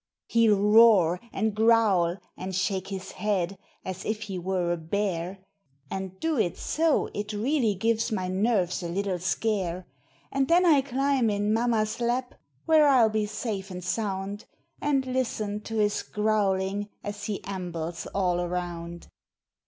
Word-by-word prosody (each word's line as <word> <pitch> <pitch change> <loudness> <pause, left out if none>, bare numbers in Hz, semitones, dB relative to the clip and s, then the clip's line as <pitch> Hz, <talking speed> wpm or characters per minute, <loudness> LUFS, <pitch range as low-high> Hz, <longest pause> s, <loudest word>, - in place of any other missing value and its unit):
He'll 225 -3 +4
roar 205 -5 +6
and 220 +1 0
growl 215 -6 +3 0.2
and 190 0 -5
shake 190 0 -1
his 190 -1 -6
head 195 -2 -1 0.3
as 185 0 -5
if 215 0 -2
he 195 -4 -5
were 180 -1 -1
a 175 - 0
bear, 185 +1 -3 0.5
And 190 -1 -5
do 320 -5 0
it 175 -6 0
so 320 -1 +1
it 210 +1 -4
really 230 0 +1
gives 225 +3 0
my 185 -4 -1
nerves 190 -1 +1
a 170 - -4
little 190 0 -1
scare; 185 -2 -1 0.5
And 270 -1 +1
then 350 +2 +4
I 300 -5 +6
climb 270 -2 +1
in 205 +1 0
mamma's 225 -1 0
lap, 245 +2 -1 0.3
where 315 -2 +5
I'll 250 -5 +5
be 215 -1 0
safe 205 -2 -4
and 180 -1 -7
sound, 200 +1 -3 0.4
And 275 -2 +1
listen 225 -5 -2
to 225 - -5
his 210 -1 +1
growling 205 -1 0
as 205 0 -5
he 210 -2 -4
ambles 175 -3 -5
all 180 -3 0
around. 175 -1 -4
205 Hz, 150 wpm, -27 LUFS, 185-225 Hz, 0.5 s, roar